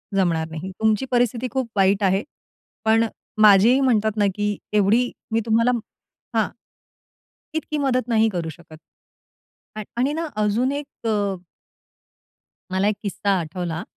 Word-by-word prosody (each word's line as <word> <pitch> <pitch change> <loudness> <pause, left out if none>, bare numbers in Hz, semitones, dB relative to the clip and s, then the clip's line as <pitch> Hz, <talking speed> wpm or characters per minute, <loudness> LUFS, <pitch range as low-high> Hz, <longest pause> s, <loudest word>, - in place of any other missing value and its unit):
जमणार 170 -4 +1
नाही. 160 +4 -6
तुमची 220 +2 +2
परिस्थिती 245 0 +1
खूप 260 -3 -2
वाईट 195 +1 +3
आहे, 195 +2 +2 0.6
पण 225 +1 +4 0.4
माझेही 215 +5 +7
म्हणतात 220 -5 +2
ना, 205 - +3
की 205 0 -1 0.2
एवढी 220 +5 +3 0.2
मी 225 - +2
तुम्हाला 230 +2 +3 0.6
हां, - - +3 1.1
इतकी 305 0 -3
मदत 255 -4 0
नाही 225 -2 +3
करू 175 -5 -3
शकत. 160 -1 -13 1.0
आ - - -3 0.2
आणि 265 +4 +1
ना, 330 +1 -2
अजून 215 +5 +1
एक 285 -5 -6
अ 205 -3 0 1.4
मला 190 +2 +1
एक 210 - +1
किस्सा 200 0 -1
आठवला. 170 0 -4
215 Hz, 135 wpm, -22 LUFS, 195-245 Hz, 1.4 s, माझेही